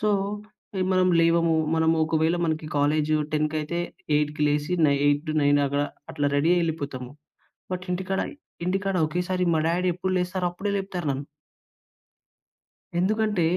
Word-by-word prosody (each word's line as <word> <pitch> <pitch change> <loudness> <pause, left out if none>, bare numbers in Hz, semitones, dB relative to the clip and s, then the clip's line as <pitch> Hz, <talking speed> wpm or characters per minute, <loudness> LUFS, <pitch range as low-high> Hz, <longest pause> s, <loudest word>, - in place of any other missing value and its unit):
So, 210 0 +2 0.7
ఎ - - +3
మనము 185 -1 +3
లేవము. 165 0 +3 0.2
మనము 160 0 +3
ఒకవేళ 160 +2 +1
మనకి 155 -1 -1
కాలేజు 150 +2 +2 0.2
టెన్‍కయితే, 155 +2 -1 0.4
8కి 150 0 -1
లేసి 150 +3 0
నై 140 0 +3
8-9 145 -1 +2
అక్కడ 140 +1 0 0.3
అట్లా 145 -1 0
రెడీ 155 +4 +3
అయి 175 - +2
యెళ్ళిపోతాము. 140 -6 -3 0.6
బట్ 180 0 -3
ఇంటికాడ, 190 +1 -1 0.5
ఇంటికాడ 195 +1 0
ఒకేసారి 180 +2 -1
మా 160 - +2
డాడి 180 +2 +1
ఎప్పుడు 185 +1 -2
లేస్తారో 180 0 -1
అప్పుడే 195 +3 -3
లేపుతారు 185 -5 -4
నన్ను. 140 +1 -3 1.7
ఎందుకంటే 210 -1 +1
165 Hz, 135 wpm, -25 LUFS, 150-180 Hz, 1.7 s, ఎ